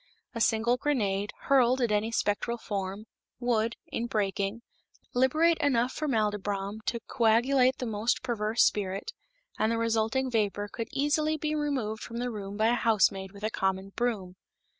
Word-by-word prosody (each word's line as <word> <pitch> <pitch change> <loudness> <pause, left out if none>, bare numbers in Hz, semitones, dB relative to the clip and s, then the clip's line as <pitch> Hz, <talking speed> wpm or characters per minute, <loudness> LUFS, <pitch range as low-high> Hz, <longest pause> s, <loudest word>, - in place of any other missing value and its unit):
A 230 - -4
single 230 +2 +3
grenade, 205 -8 0
hurled 260 -2 +4
at 240 -4 +1
any 210 +2 +1
spectral 230 +2 0
form, 200 -1 -4 0.3
would, 230 -2 +1
in 235 - -2
breaking, 205 +1 -1 0.5
liberate 310 +7 +3
enough 250 -3 +2
formaldybrom 210 -6 -1
to 235 -1 -1
coagulate 250 +3 +3
the 250 - -4
most 220 +2 0
perverse 225 -2 +1
spirit, 195 - -1 0.5
and 220 - +2
the 230 - 0
resulting 230 +3 0
vapor 205 -2 0
could 230 +1 -5
easily 305 +2 +1
be 305 0 -2
removed 265 -8 -2
from 235 - -7
the 245 +1 -2
room 200 -2 -6
by 220 +1 +3
a - - +3
housemaid 195 -5 +2
with 200 +1 -13
a 215 - 0
common 190 -1 -1
broom. 195 -5 -2
225 Hz, 155 wpm, -29 LUFS, 205-250 Hz, 0.5 s, hurled